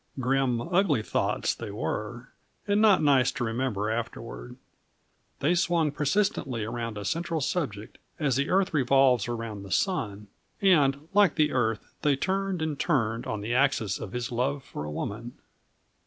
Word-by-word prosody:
Grim, 130 -1 +1
ugly 170 - +1
thoughts - - 0
they 115 - -7
were, 110 +4 -4 0.4
and 205 +1 +3
not 205 -6 +5
nice 135 -3 +4
to 130 - -3
remember 115 -3 -1
afterward. - - -5 0.9
They 150 +5 +3
swung 170 -3 +2
persistently 145 - 0
around 115 0 -4
a 100 - -5
central 170 -1 -1
subject, 130 - -3 0.2
as 140 -5 +1
the 140 +3 0
earth 190 -1 +2
revolves 130 -5 +3
around 115 -3 -4
the 100 - -10
sun; 105 - -1 0.3
and, 150 -7 +3
like 205 -4 +5
the 150 -1 +2
earth, 115 -4 -1
they 145 -2 +3
turned 190 +2 -1
and 155 -3 -3
turned 115 -8 0
on 105 - -3
the 110 +3 -2
axis 125 -7 +1
of 95 - -6
his 125 -1 -3
love 130 +3 -1
for 75 - -7
a 75 - -5
woman. 115 +10 -5
130 Hz, 155 wpm, -27 LUFS, 115-160 Hz, 0.9 s, not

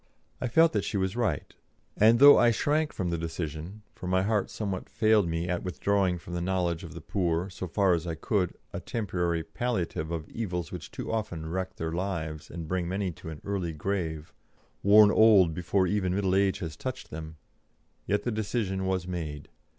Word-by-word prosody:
I 125 - 0
felt 160 +7 +4
that 105 -2 +1
she - - -2
was 95 +1 -1
right, 110 - -1 0.4
and 110 +2 +6
though 145 +3 +10
I 120 - +5
shrank 150 +6 +1
from 90 -2 -3
the 85 - -1
decision 80 +4 -5
for 90 - -8
my 95 +1 +2
heart 105 -1 0
somewhat 100 -4 -4
failed 110 -4 +3
me 85 +1 -2
at 90 -1 -1
withdrawing 95 0 0
from 85 0 -10
the 85 - -2
knowledge 90 -2 -1
of 85 0 -9
the 85 - -7
poor, 90 0 -1
so 90 - -5
far 95 +1 +2
as 85 0 -1
I 80 - -2
could, 90 +2 -1 0.2
a - - -3
temporary 90 -6 -2
palliative 90 -6 -2
of 80 -2 -4
evils 90 -8 -4
which - - -7
too - - -6
often 105 -8 -3
wreck 95 +2 -3
their 80 0 -3
lives 80 -4 -3
and 85 -2 -6
bring 90 0 -1
many 95 0 -1
to 80 - -10
an 75 -2 -8
early 95 -5 -2
grave, 80 -2 -3 0.5
worn 105 +1 +7
old 105 -7 +6
before 90 +3 +1
even 95 -1 0
middle 95 -2 +1
age 95 0 +3
has 80 -4 -4
touched 130 +8 -6
them 80 0 -7 0.7
yet 105 0 +1
the 120 - -1
decision 105 -3 -2
was 95 -2 -1
made. 80 -5 -5
95 Hz, 195 wpm, -28 LUFS, 85-105 Hz, 0.7 s, though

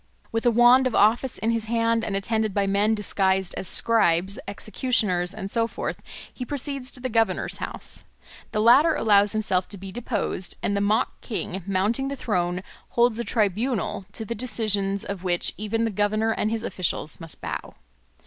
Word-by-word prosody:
With 225 +2 0
a - - +6
wand 240 +3 +6
of 250 - -2
office 230 +5 +3
in 225 - 0
his 230 -1 -1
hand 230 0 +1
and 205 -3 -2
attended 215 +1 -1
by 200 -1 +2
men 200 +3 +2
disguised 190 -2 0
as 190 - -4
scribes, 195 -4 +2
executioners, 200 -4 0
and 200 -1 -6
so 230 -1 +1
forth, - - -5 0.3
he 255 - -6
proceeds 275 0 -2
to 255 - -6
the 255 - -2
Governor's 225 -2 0
house. - - -4 0.5
The 215 - 0
latter 275 +9 +6
allows 205 -1 +4
himself 195 -4 +1
to 200 - -8
be 195 0 -8
deposed; 205 -4 -3
and 200 - 0
the 200 - 0
mock 210 +2 0
king, 195 -4 -4
mounting 205 +8 +1
the 280 - -3
throne, 180 -7 -1 0.3
holds 235 -1 +2
a - - 0
tribunal, 215 -2 -1
to 220 - -5
the 235 - -3
decisions 205 -4 0
of 195 -2 -5
which 175 -1 +2
even 225 +2 -1
the 225 - -1
governor 210 +2 +1
and 215 - 0
his 225 0 -2
officials 175 -7 -3
must 165 -3 -9
bow. - - -6
215 Hz, 180 wpm, -25 LUFS, 195-230 Hz, 0.5 s, a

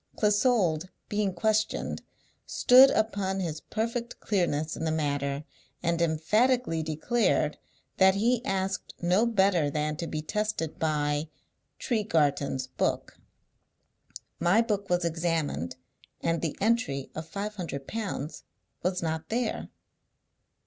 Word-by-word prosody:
Clissold, 205 -6 +2 0.2
being 205 -2 0
questioned, 215 +4 0 0.5
stood 260 +2 +7
upon 200 -5 0
his 160 -4 -3
perfect 230 +2 -3
clearness 160 -6 0
in - - -5
the 160 - 0
matter, 145 -2 -1 0.4
and 170 0 +1
emphatically 170 +5 +2
declared 160 +1 +1 0.4
that 190 0 +6
he 235 +4 +2
asked 195 -2 -2
no 185 +7 +3
better 190 -8 +3
than 150 +1 -1
to 170 0 -4
be 155 -1 -4
tested 210 -3 -2
by 150 -1 0 0.5
'Tregarthen's 150 - 0
book.' 130 - -2 1.2
My 175 +6 +4
book 205 -3 -2
was 175 -1 +1
examined, 165 - -1 0.4
and 165 0 0
the 160 -3 -2
entry 205 - 0
of 160 0 -6
five 205 +4 -4
hundred 145 -7 -5
pounds 195 -9 -4 0.4
was 180 0 -1
not 160 -1 -3
there." 235 0 -2
175 Hz, 115 wpm, -28 LUFS, 155-215 Hz, 1.2 s, stood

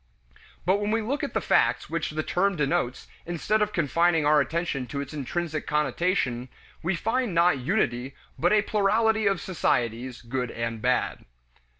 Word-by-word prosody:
But 185 +3 +3
when 205 0 -2
we 225 +1 +1
look 275 +7 -2
at - - -4
the - - +3
facts - - +2
which 165 -1 -2
the 155 +1 -3
term 195 +4 +1
denotes 135 -4 -1 0.2
instead 175 +5 0
of 210 0 +1
confining 165 -1 +2
our 150 0 +5
attention 165 -6 -2
to 140 - -4
its 140 +1 -5
intrinsic 155 +2 -3
connotation, 150 -5 0 0.3
we 175 +3 0
find 225 +1 -1
not 170 -4 +4
unity, 130 - -1 0.2
but 175 +2 +3
a 215 -1 +4
plurality 220 +1 +2
of 195 -3 +2
societies, 125 - -1
good 125 +1 -2
and 115 -1 -4
bad. 125 +1 0
165 Hz, 165 wpm, -26 LUFS, 130-195 Hz, 0.3 s, our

